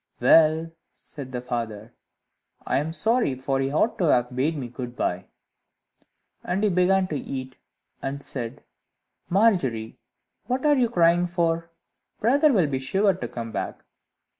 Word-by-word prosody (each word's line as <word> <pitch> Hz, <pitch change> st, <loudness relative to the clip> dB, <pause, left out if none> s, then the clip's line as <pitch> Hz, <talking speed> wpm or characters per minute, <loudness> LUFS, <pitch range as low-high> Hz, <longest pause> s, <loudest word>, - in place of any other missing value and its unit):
"Well," 160 Hz, +1 st, +4 dB, 0.2 s
said 135 Hz, -4 st, -10 dB
the 125 Hz, -1 st, -4 dB
father, 115 Hz, -2 st, -5 dB, 0.7 s
"I -, -, +1 dB
am 155 Hz, +3 st, -3 dB
sorry; 220 Hz, -, +2 dB
for 135 Hz, +1 st, -2 dB
he 135 Hz, 0 st, -1 dB
ought 215 Hz, +10 st, +1 dB
to 180 Hz, -, +2 dB
have 125 Hz, -4 st, +2 dB
bade 150 Hz, +5 st, 0 dB
me 130 Hz, -4 st, -4 dB
good 120 Hz, 0 st, -7 dB
bye." 90 Hz, -4 st, -2 dB, 1.2 s
After -, -, -2 dB
that 200 Hz, -, -1 dB
he 210 Hz, -, +4 dB
began 185 Hz, +1 st, +3 dB
to 155 Hz, -, -3 dB
eat, 130 Hz, -2 st, -6 dB, 0.4 s
and 140 Hz, +1 st, -4 dB
said, 120 Hz, -4 st, -6 dB, 0.7 s
"Margery, 175 Hz, -, +1 dB, 0.5 s
what 255 Hz, +3 st, -1 dB
are 295 Hz, -1 st, +5 dB
you 250 Hz, -4 st, +2 dB
crying 175 Hz, -3 st, +3 dB
for? 170 Hz, -1 st, -1 dB, 0.5 s
Brother 285 Hz, +7 st, +4 dB
will 190 Hz, -10 st, +3 dB
be 135 Hz, -3 st, -2 dB
sure 195 Hz, +9 st, +2 dB
to 185 Hz, -, -5 dB
come 115 Hz, -1 st, -6 dB
back. -, -, -5 dB
155 Hz, 155 wpm, -25 LUFS, 130-190 Hz, 1.2 s, are